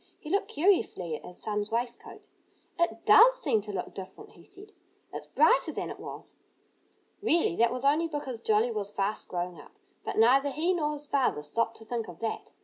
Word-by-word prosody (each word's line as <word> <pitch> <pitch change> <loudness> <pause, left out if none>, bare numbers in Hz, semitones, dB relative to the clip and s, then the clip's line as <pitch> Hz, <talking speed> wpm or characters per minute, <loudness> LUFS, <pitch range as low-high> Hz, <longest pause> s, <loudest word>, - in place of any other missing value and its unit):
He 305 - -8
looked 400 - +1
curiously 285 - +1
at - - -10
his 180 - -8
son's 210 -1 -2
waistcoat. 235 +1 -5 0.5
"It 340 - 0
does - - +8
seem 220 - +2
to 210 +1 -7
look 195 - -5
different," 195 - -10
he - - -18
said. 410 +2 -13 0.4
"It's - - -7
brighter - - +3
than - - -4
it - - -9
was." - - -9 0.9
Really, 335 - +2
that 235 0 +3
was 250 +2 -3
only 305 +4 +3
because 290 -6 -5
Jolly 220 +1 +2
was 205 -2 -4
fast 200 +1 -2
growing 175 -3 -4
up. - - -18 0.3
But - - -4
neither 265 +6 +5
he 325 +6 0
nor 300 -4 -1
his 295 0 -8
father 265 - 0
stopped 230 +9 -1
to 225 - -14
think 230 -1 -3
of 170 - -11
that. 225 - -5
235 Hz, 195 wpm, -28 LUFS, 210-305 Hz, 0.9 s, does